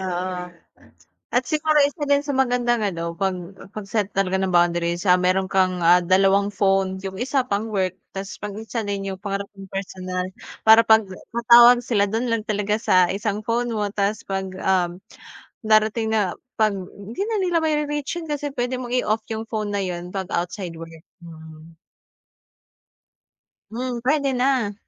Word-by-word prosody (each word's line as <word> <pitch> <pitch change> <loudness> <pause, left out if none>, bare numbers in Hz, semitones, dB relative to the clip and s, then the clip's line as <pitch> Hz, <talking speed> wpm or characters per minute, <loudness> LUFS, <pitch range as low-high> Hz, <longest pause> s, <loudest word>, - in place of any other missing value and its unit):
oo. 180 -1 -3 0.9
At 245 +1 +3
siguro 305 -1 +3
isa 290 +1 0
din 285 0 +3
sa 290 - -10
maganda, 245 -2 +2
ano, 170 -5 -3
'pag 190 0 0 0.4
'pag 215 -2 -6
set 210 -2 -1
talaga 190 -1 +1
ng 190 -1 -1
boundaries, 175 0 +2
ah, 180 - +7
meron 185 +1 +1
kang, 185 -2 +1
ah, 175 +2 +6
2 195 +3 +2
phone, 195 -1 +1
'yong 190 -1 -6
1 265 +3 0
pang 210 +2 -2
work, 185 -1 -1 0.2
tas 195 0 -6
'pag 205 -1 -6
isa 225 -1 -4
na 205 - -2
'yong 195 -1 -4
para 200 0 -3
mong 195 -1 -12
personal, 185 -1 -4 0.3
para 220 +1 +7
'pag, 220 -3 +4 0.4
tawag 240 +1 +9
sila 205 -5 +1
do'n 225 +4 -2
lang 230 -2 0
talaga 210 0 0
sa 185 -5 +3
1 205 +1 -2
phone 235 +2 -1
mo, 210 -2 -1
tas 205 +1 -1
'pag, 195 -1 -3 0.2
um, 180 -1 0 0.6
darating 220 +1 +2
na 200 -5 +1 0.2
'pag 215 -2 +3 0.2
hindi 210 - -8
na 445 -2 -1
nila 350 -2 +1
mari-reach 300 +2 -1
yun 325 - -9
kasi 290 -1 -3
puwede 250 0 -2
mong 245 -1 -5
i-off 215 +1 -1
'yong 220 0 -4
phone 215 -2 -3
na 200 - 0
'yon 180 -1 -5
'pag 190 -2 -4
outside 175 -1 -3
work, 165 -1 -10 0.2
mhm. 160 -1 -13 2.0
Hmm, 245 +1 -4
puwede 280 0 +1
na. 250 -4 +1
205 Hz, 165 wpm, -22 LUFS, 185-235 Hz, 2.0 s, tawag